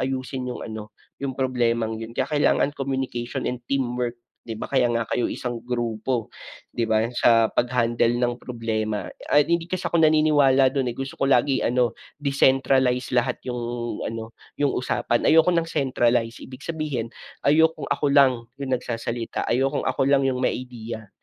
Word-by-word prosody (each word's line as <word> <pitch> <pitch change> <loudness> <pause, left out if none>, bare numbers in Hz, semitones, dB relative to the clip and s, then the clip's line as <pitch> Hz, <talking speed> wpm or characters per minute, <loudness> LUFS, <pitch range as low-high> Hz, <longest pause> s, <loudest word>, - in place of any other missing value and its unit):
ayusin 130 0 -3
yung 125 - -5
ano, 110 -1 -8 0.3
yung 140 -1 -2
problemang 120 -4 0
'yon. 115 +1 -7
Kaya 130 - 0
kailangan 145 0 +2
communication 130 -3 -3
and 125 0 -4
teamwork 125 -3 -1 0.3
'di 110 - -4
ba? - - -5
Kaya 130 -3 +2
nga 115 0 0
kayo 120 - +1
isang 120 -2 -4
grupo, 120 -1 -2 0.4
di 115 -1 -1
ba 110 0 +3
yung 115 - -4
sa 115 -2 +4
paghandle 120 -1 +1
ng 120 0 -1
problema 110 -3 -3 0.2
at 145 - +5
hindi 170 +1 0
kasi 185 0 -3
ako 170 -1 +1
naniniwala 145 -4 +4
do'n 135 -3 0
,eh, - - -16
gusto 135 +1 -4
ko 135 - +2
lagi 135 +1 +3
ano 120 -1 +1 0.2
decentralize 130 -3 +2
lahat 125 -1 +1
yung 125 -1 -3 0.5
ano 115 0 -6 0.2
yung 145 -2 +1
usapan, 120 -1 0
ayoko 160 +3 +5
ng 170 -1 +1
centralize 120 -6 0
ibig 130 +2 -11
sabihin, 150 -8 -3 0.3
ayokong 160 +3 +3
ako 145 - 0
lang 140 -2 +6 0.2
yung 135 -2 -4
nagsasalita, 115 -1 -3
ayokong 135 +4 +1
ako 135 - +1
lang 140 -1 +4
yung 130 -1 0
may - - +1
ideya, 115 -4 -8
125 Hz, 165 wpm, -24 LUFS, 115-140 Hz, 0.5 s, lang